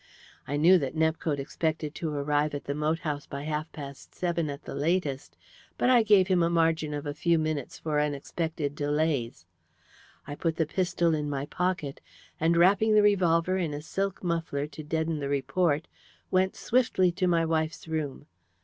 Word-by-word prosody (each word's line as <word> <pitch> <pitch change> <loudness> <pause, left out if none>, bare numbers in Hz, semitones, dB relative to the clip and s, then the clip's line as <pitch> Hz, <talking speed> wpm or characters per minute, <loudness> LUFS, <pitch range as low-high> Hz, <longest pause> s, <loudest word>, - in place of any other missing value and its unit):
I 145 - -1
knew 175 +5 +6
that 135 0 -3
Nepcote 160 -1 +1
expected 155 +2 -2
to 165 - -3
arrive 145 +1 0
at 145 - -5
the 140 - -3
moat 150 +2 0
house 145 -2 -3
by 140 0 -6
half 155 +1 -3
past 140 -2 -10
seven 170 -3 -1
at 140 +1 -6
the - - -7
latest, 140 - -1 0.4
but 250 - +3
I 245 -2 +6
gave 205 -4 +5
him 185 -2 +3
a 170 - +3
margin 165 -2 +1
of 145 +1 -5
a 145 - -3
few 165 +3 +2
minutes 155 -4 -2
for 150 -2 -1
unexpected 150 +1 -2
delays. 145 - -1 0.8
I 145 - -6
put 165 +2 -1
the 160 - +1
pistol 175 0 +1
in 150 -1 -1
my 140 -1 -2
pocket, 175 -4 -2 0.4
and 165 +2 +2
wrapping 200 +5 +4
the 210 - +6
revolver 185 -3 +3
in 160 -5 -2
a 145 - -5
silk 195 +4 -3
muffler 165 -5 -1
to 150 +1 -9
deaden 160 +1 -1
the 140 -1 -3
report, 145 +3 0 0.4
went 185 0 +2
swiftly 225 -7 +2
to 185 +1 0
my 165 -2 +3
wife's 160 0 -1
room. 155 -3 -3
160 Hz, 180 wpm, -28 LUFS, 145-170 Hz, 0.8 s, knew